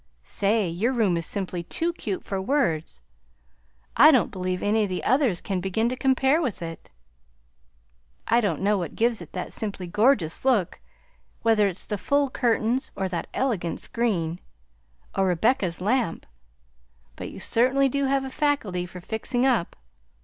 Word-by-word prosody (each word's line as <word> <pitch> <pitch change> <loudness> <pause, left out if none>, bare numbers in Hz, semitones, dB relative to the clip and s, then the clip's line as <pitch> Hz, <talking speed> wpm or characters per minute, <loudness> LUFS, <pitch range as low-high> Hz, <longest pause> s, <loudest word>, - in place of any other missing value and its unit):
Say, 205 0 +1
your 195 +10 0
room 215 -8 +2
is 165 -1 -1
simply 185 -3 -2
too 330 - -1
cute 200 - -4
for 195 -1 -3
words! 165 - -1 0.9
I 305 - +8
don't 260 -7 +3
believe 185 -1 -3
any 215 +2 +2
of 205 - 0
the 185 - -3
others 255 - +2
can 190 -2 -2
begin 205 +5 0
to 255 - -2
compare 265 +4 +2
with 235 - -3
it! 165 0 -8 1.4
I 235 +1 +3
don't 190 -8 -1
know 205 0 +2
what 175 - -5
gives 230 -3 +1
it 165 - -11
that 180 - -5
simply 200 -4 -4
gorgeous 205 - +2
look, 230 -10 +1 0.6
whether 220 -3 +4
it's 190 -1 -6
the 210 - -3
full 285 +2 +1
curtains, 240 +1 0
or 190 - -1
that 175 -2 -3
elegant 205 -11 -1
screen, 180 -8 -1 0.7
or 195 -1 +1
Rebecca's 180 0 +1
lamp; 215 -1 0 0.9
but - - -6
you - - -10
certainly 260 +4 +2
do 280 +1 0
have 270 0 +1
a 265 - -6
faculty 225 - -1
for 180 0 -10
fixing 240 +6 -1
up. 240 -10 +1
210 Hz, 160 wpm, -25 LUFS, 180-255 Hz, 1.4 s, I